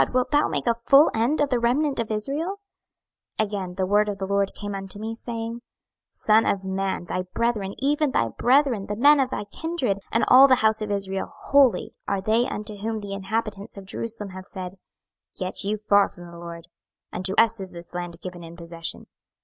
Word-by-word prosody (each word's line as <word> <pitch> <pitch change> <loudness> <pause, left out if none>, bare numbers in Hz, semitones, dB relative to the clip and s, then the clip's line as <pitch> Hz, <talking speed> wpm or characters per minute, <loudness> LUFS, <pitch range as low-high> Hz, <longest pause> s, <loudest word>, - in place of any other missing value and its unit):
wilt 255 0 +1
thou 295 0 +4
make - - -2
a 235 - +3
full 275 +6 +5
end 235 +7 +1
of 290 -1 +2
the 250 - +2
remnant 270 +4 +1
of 230 - -2
Israel? 280 - -2 0.8
26:011:014 215 - +4
Again 195 -3 -5
the 190 0 0
word 210 +2 +3
of 200 - -3
the 195 - -3
LORD 200 0 +1
came 205 -1 -5
unto 195 0 -6
me, 220 +2 -4
saying, 230 0 -5 0.5
26:011:015 - - -25
Son 220 +1 +4
of 195 -1 0
man, 190 -1 -2
thy 185 +1 -2
brethren, 220 -5 0
even 295 +2 +1
thy 115 - +1
brethren, 250 - +2
the 210 - -3
men 285 +6 +6
of 265 -2 +2
thy - - -3
kindred, 250 - -2
and 230 - +2
all 265 +2 +9
the 260 - +6
house 220 0 +3
of 215 - -3
Israel 195 -1 -2
wholly, 275 -4 +3
are 200 - 0
they 220 +5 +2
unto 210 0 -5
whom 220 +2 -3
the 205 -2 -6
inhabitants 205 +1 -3
of 195 - -9
Jerusalem 215 +1 -4
have 185 +1 -9
said, 185 0 -7 0.6
Get 185 +1 -1
you 210 +2 -1
far 205 -1 +3
from 175 - -12
the 170 - -11
LORD: 170 -1 -8 0.5
unto 185 +2 -1
us 230 -1 +4
is 190 -1 -6
this 170 0 -11
land 175 -1 -5
given 180 -2 -7
in 165 0 -10
possession. 170 -1 -6
210 Hz, 205 wpm, -24 LUFS, 190-235 Hz, 0.8 s, all